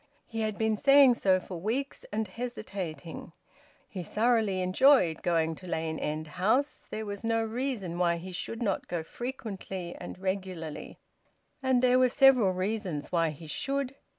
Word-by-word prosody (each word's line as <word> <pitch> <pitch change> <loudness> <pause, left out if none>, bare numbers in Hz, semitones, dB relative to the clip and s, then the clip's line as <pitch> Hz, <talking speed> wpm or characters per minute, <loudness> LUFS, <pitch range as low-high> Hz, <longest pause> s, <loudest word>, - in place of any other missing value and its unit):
He 225 -1 -4
had 215 -2 -1
been 220 -1 +1
saying 275 +1 +7
so 190 -5 +3
for 180 -1 -7
weeks, 255 +8 -3
and 215 +1 -1
hesitating. 185 - -6 0.5
He 190 -6 -6
thoroughly 215 +1 +1
enjoyed 185 - +4
going 165 -2 +1
to 185 - -11
Lane 160 -1 -2
End 155 +1 -2
House; 220 - 0
there 220 0 -4
was 205 0 -6
no 225 0 +1
reason 225 -7 -3
why 170 -1 +2
he 185 +2 -8
should 230 +6 -4
not 200 -4 -1
go 170 -2 -3
frequently 195 -5 -6
and - - -8
regularly, 185 -4 -4 0.6
and 260 -2 +2
there 255 0 +5
were 255 -1 +5
several 255 -6 +5
reasons 185 -5 -3
why 165 -2 +2
he 155 +2 -9
should. 275 - -2
200 Hz, 155 wpm, -29 LUFS, 175-240 Hz, 0.6 s, saying